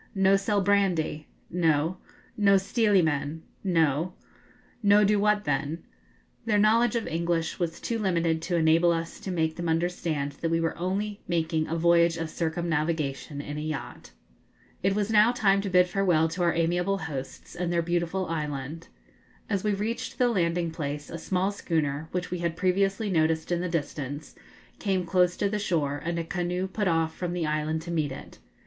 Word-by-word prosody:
'No 195 0 +4
sell 200 +1 +1
brandy?' 185 -6 +1 0.2
'No.' 165 0 +1 0.4
'No 200 -2 +5
stealy 200 -1 +2
men?' 155 +1 -1 0.2
'No.' 165 -2 +1 0.7
'No 205 0 +5
do 205 0 +3
what 210 0 +2
then?' 145 +2 -2 0.6
Their 215 -2 +2
knowledge 225 +3 +4
of 230 - -1
English 165 0 -1
was 170 -2 -2
too 230 -1 -2
limited 170 -5 +1
to 175 - -2
enable 165 +1 +4
us 165 0 -3
to - - -7
make 160 -3 0
them 170 -1 -2
understand 160 -3 -1
that 165 - 0
we 165 0 +1
were 165 0 -1
only 200 +4 -2
making 160 -2 0
a 165 - -2
voyage 170 0 +4
of 165 -1 -4
circumnavigation 160 -4 -2
in 145 +1 -5
a - - -4
yacht. 155 -3 -5 0.7
It 195 +1 +1
was 210 +1 0
now 215 +2 +6
time 200 -4 +3
to 200 - -3
bid 180 -1 +5
farewell 180 -4 +2
to 170 +3 -4
our 170 -1 +2
amiable 175 +4 +1
hosts 150 -3 -7
and 175 -1 -2
their 170 -1 +1
beautiful 175 +2 -1
island. 150 -1 -4 0.6
As 200 -2 0
we 210 - +1
reached 220 +4 -3
the 250 -1 +3
landing 170 -5 0
place, 145 -2 -5
a 165 - -5
small 185 +4 0
schooner, 160 -5 -2
which 180 -1 -3
we 180 - -2
had 170 -1 -2
previously 195 +3 +1
noticed 160 -1 +1
in 175 0 +1
the 180 - -2
distance, 145 -2 -4 0.5
came 190 -4 0
close 180 0 +2
to 200 - +1
the 210 +1 -1
shore, 150 -7 -1
and 170 +1 -2
a 170 - -1
canoe 180 +2 -2
put 205 +1 -2
off 165 -2 +1
from 175 -1 -3
the 175 -2 -1
island 155 +1 -1
to 170 - -6
meet 155 -4 0
it. 130 - -10
170 Hz, 180 wpm, -27 LUFS, 160-195 Hz, 0.7 s, now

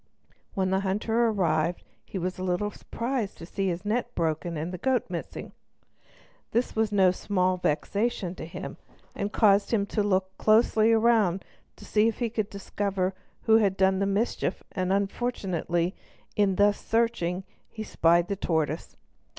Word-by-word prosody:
When 190 -1 0
the 190 - +2
hunter 215 +4 +1
arrived 170 -5 0 0.2
he - - -7
was 185 0 -3
a - - -3
little 185 +3 0
surprised 235 -1 -3
to 165 - -9
see 195 +2 -2
his 175 +2 -3
net 240 +3 -1
broken 165 +1 -1
and 165 +4 -4
the 180 - -5
goat 255 -3 +1
missing. - - -6 1.0
This 240 +2 0
was 220 -1 +1
no 190 -3 +5
small 185 -1 0
vexation 185 +4 -1
to - - -7
him, - - -7 0.4
and 200 +1 -3
caused 205 -2 +4
him 210 -4 +1
to 210 +1 -1
look 190 -2 0
closely 220 0 +4
around, 220 -5 +3 0.3
to - - -13
see 215 +1 +3
if 225 - -1
he 235 -3 -1
could 215 -2 -2
discover 195 -1 -2 0.3
who 220 -1 +6
had 200 -3 +2
done 190 0 +3
the 200 - +1
mischief; 200 +4 -1
and 185 -1 -1
unfortunately, 195 -4 -1 0.4
in 200 -2 +2
thus 205 +1 +3
searching, 225 -6 0 0.3
he 220 - -6
spied 170 -3 +3
the 200 - -1
tortoise. 160 -4 -2
195 Hz, 160 wpm, -27 LUFS, 180-220 Hz, 1.0 s, who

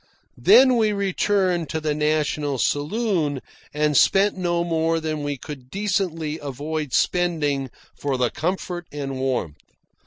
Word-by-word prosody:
Then 260 - +7
we 215 -2 +2
returned 190 -3 0
to 160 - -2
the 155 -1 -1
National 150 -1 0
Saloon 150 - 0 0.3
and 150 0 0
spent 195 +8 +4
no 175 -2 0
more 165 -1 0
than 155 -1 -3
we 145 -1 -3
could 130 -1 -9
decently 180 -6 -2
avoid 145 +1 -4
spending 150 -7 +1 0.2
for 140 -2 -2
the 125 -2 +1
comfort 175 +2 -3
and 135 -2 -5
warmth. 130 - -2
155 Hz, 130 wpm, -23 LUFS, 145-180 Hz, 0.3 s, Then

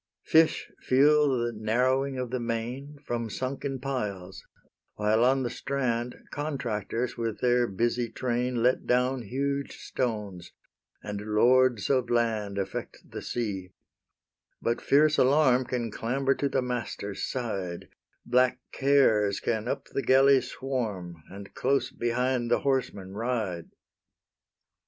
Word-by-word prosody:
Fish 160 0 +3
feel 145 +3 +4
the 120 -3 0
narrowing 130 +5 +1
of 125 -2 -4
the 130 - -1
main 120 +5 -4
From 115 -1 -2
sunken 135 +3 -4
piles, 105 -9 -4 0.5
while 105 +2 +2
on 130 +1 +3
the 120 - -1
strand 125 -2 -2 0.2
Contractors 125 -5 -3
with 115 -2 -3
their 125 -1 +3
busy 120 +4 -1
train 125 0 -1
Let 125 +1 +2
down 125 +1 +2
huge 140 +5 -3
stones, 105 -8 -4 0.5
and 105 -1 -5
lords 125 -1 +4
of 130 -3 +1
land 110 -4 0
Affect 95 -1 -5
the - - -6
sea: 95 -6 -4 0.9
but 120 +1 -1
fierce 150 +2 +4
Alarm 130 -1 +4
Can 120 -3 -3
clamber 135 +5 0
to 140 0 -1
the 130 - 0
master's 115 -5 -4
side: 100 -9 -3 0.4
Black 125 +1 +3
Cares 115 -8 +3
can 110 -1 -2
up - - -2
the - - -2
galley 135 0 +5
swarm, 110 -10 -4
And 100 +1 -10
close 140 +2 0
behind 120 +1 0
the 120 - +2
horseman 125 -9 -1
ride. 105 -7 -2
120 Hz, 125 wpm, -28 LUFS, 110-130 Hz, 0.9 s, galley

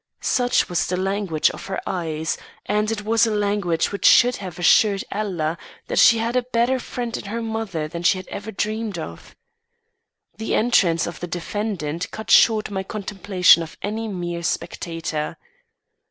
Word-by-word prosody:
Such 245 -1 +2
was 175 -2 0
the 180 - -1
language 190 -4 0
of - - -9
her 190 - -3
eyes; 160 -3 -2 0.3
and 210 +1 0
it 215 -2 -3
was 225 +1 +3
a 215 - -1
language 200 -5 0
which 200 - +2
should 245 +1 +6
have 185 -4 -8
assured 195 +3 +4
Ella 175 -6 -2 0.3
that - - +1
she 230 - +7
had 230 +2 -1
a 250 - +3
better 245 +1 0
friend 240 -1 -5
in - - -6
her 220 +4 -4
mother 220 -8 -3
than 170 +2 -6
she 175 +2 +3
had 185 - -8
ever 215 +2 -6
dreamed 215 -1 -3
of. 160 - -8 1.0
The 220 - -1
entrance 180 -8 +3
of 170 - -6
the 175 - -5
defendant 175 -2 -3
cut 220 - -6
short 215 -2 +5
my 190 -1 -2
contemplation 195 -3 +3
of 165 -1 -8
any 220 +2 -3
mere 175 -4 -4
spectator. 165 -2 -3
200 Hz, 170 wpm, -22 LUFS, 175-220 Hz, 1.0 s, she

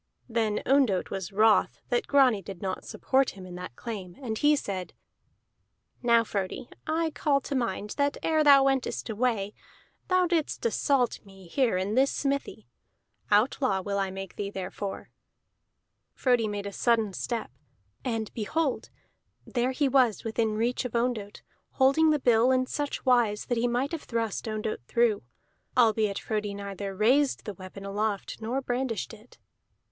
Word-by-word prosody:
Then 225 -3 0
Ondott 260 -9 +2
was 195 0 -4
wroth 215 +2 +4
that 480 -3 0
Grani 260 -7 +4
did 190 -1 -9
not 190 0 -4
support 265 0 +1
him 185 - -9
in 180 - -9
that 180 -7 -8
claim, 195 - -6
and 235 -5 -3
he 295 +6 +4
said: 190 -9 -4 1.1
"Now, 235 -2 +4
Frodi, 200 +2 -4 0.2
I 320 +1 0
call 285 -2 +1
to 280 - -5
mind 210 -5 -2
that 285 -1 +1
ere 315 -1 +3
thou 280 -2 +7
wentest 270 -3 0
away, 215 -3 0 0.5
thou 370 -1 +3
didst 330 -7 -1
assault 245 +3 +1
me 195 -2 -15
here 235 +1 +1
in 190 +3 -1
this 265 +3 +4
smithy. 280 0 -2 0.6
Outlaw 210 -1 +2
will 200 +1 -2
I 195 -1 0
make 195 0 -7
thee 200 -1 -3
therefor." 195 +1 -6 1.0
Frodi 245 -4 +2
made 205 -1 -4
a 200 - -5
sudden 225 -4 +2
step, 230 - -3 0.5
and 225 -4 -3
behold! 270 +6 -1 0.6
there 245 0 0
he 275 +2 +1
was 255 -5 +3
within 225 -1 0
reach 235 +4 0
of 250 - -5
Ondott, 230 -4 -2 0.3
holding 275 +4 +4
the 305 - +4
bill 245 -2 +4
in 255 0 +2
such 290 +3 -3
wise 240 -5 +3
that 245 - -1
he 240 - +2
might 245 +4 0
have 330 -2 -4
thrust 230 -2 -2
Ondott 215 - -3
through, 235 -3 +2 0.6
albeit 220 -4 +3
Frodi 210 -2 -3
neither 200 -1 -5
raised 255 +8 +2
the 210 - -4
weapon 190 +1 -10
aloft 205 +1 -2
nor 245 +5 -1
brandished 245 -4 -2
it. 225 +2 -16
230 Hz, 155 wpm, -28 LUFS, 200-265 Hz, 1.1 s, thou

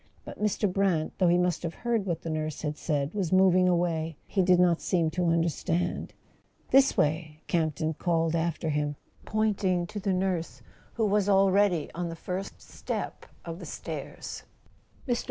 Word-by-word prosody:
But - - -9
Mr. 210 0 +1
Brant, 185 -4 +1
though 185 - +4
he 175 +1 +4
must 180 0 +1
have 170 -1 -4
heard 230 -4 -1
what 170 -3 -2
the 165 - -4
nurse 155 -1 -3
had 150 -1 -2
said, 145 -1 -1
was 195 -6 -1
moving 185 -1 +5
away; 165 -3 0
he 195 - 0
did 180 -1 +4
not 175 -2 +3
seem 165 -3 +1
to 180 +1 0
understand. 170 +1 -1 0.6
"This 270 0 +5
way 155 0 0
" - - -41
Camp 160 -3 +1
ton 155 +2 -1
called 165 0 0
after 165 -1 -1
him, 150 -1 -1 0.3
pointing 200 -5 +1
to 205 +4 -6
the 195 0 -1
nurse, 185 -2 -1 0.3
who 225 - +1
was 205 -1 +2
already 195 -4 +3
on 175 +1 -3
the 165 - -5
first 185 +3 -5
step - - -5 0.2
of 165 0 -6
the - - -8
stairs. - - -6 0.7
Mr. 245 -2 +1
175 Hz, 175 wpm, -28 LUFS, 160-195 Hz, 0.7 s, moving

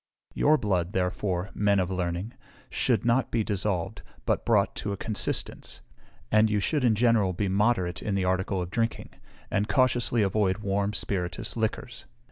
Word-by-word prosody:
Your 155 +2 +4
blood, 95 - -1
therefore, 90 0 -1
men 100 -1 +2
of 95 0 -1
learning, 90 +4 -3 0.4
should - - +1
not 120 +2 +2
be 115 -2 0
dissolved, 100 -1 -2 0.2
but - - 0
brought - - +3
to 105 - -3
a 100 - -3
consistence; 110 +1 -2 0.5
and 110 +1 +5
you 105 -1 +1
should 145 +7 0
in 115 -3 +4
general 110 -4 +3
be 100 +3 -1
moderate 95 -2 +1
in 100 - -2
the 95 -1 0
article 95 +1 0
of 90 - -8
drinking, 115 0 -2 0.4
and 105 +2 0
cautiously 120 -4 +2
avoid 95 -1 +1
warm 100 0 -1
spirituous 90 -3 -2
liquors. 115 +1 -3
100 Hz, 160 wpm, -27 LUFS, 95-115 Hz, 0.5 s, and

